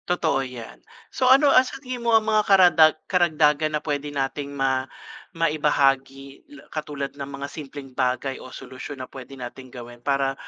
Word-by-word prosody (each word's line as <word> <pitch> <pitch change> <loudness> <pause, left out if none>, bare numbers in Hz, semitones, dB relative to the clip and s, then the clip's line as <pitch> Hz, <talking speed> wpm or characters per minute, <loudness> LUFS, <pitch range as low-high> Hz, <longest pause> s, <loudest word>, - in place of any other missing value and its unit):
Totoo 160 -6 +1
'yan. 120 - -9 0.3
So, 255 - +2
ano 275 +2 +6
ang - - +8
sa 260 +1 -7
tingin 255 -2 -6
mo 235 -1 +4
ang 220 - -1
mga 215 -1 +3
karadag 175 -5 +6
karagdagan 155 -4 +2
na - - -8
pwede 145 -1 -2
nating 140 0 -3
ma 135 -2 -1 0.4
maibahagi 140 -4 0 0.2
la - - -17
katulad 150 -3 -5
ng 140 -1 -7
mga 140 0 -6
simpleng 140 -2 -9
bagay 130 +1 -1
o - - -10
solusyon 130 +2 -9
na 130 - -6
pwede 135 +1 -11
nating 130 +1 -9
gawin 120 -1 -11
para 135 0 +1
140 Hz, 170 wpm, -24 LUFS, 135-160 Hz, 0.4 s, ang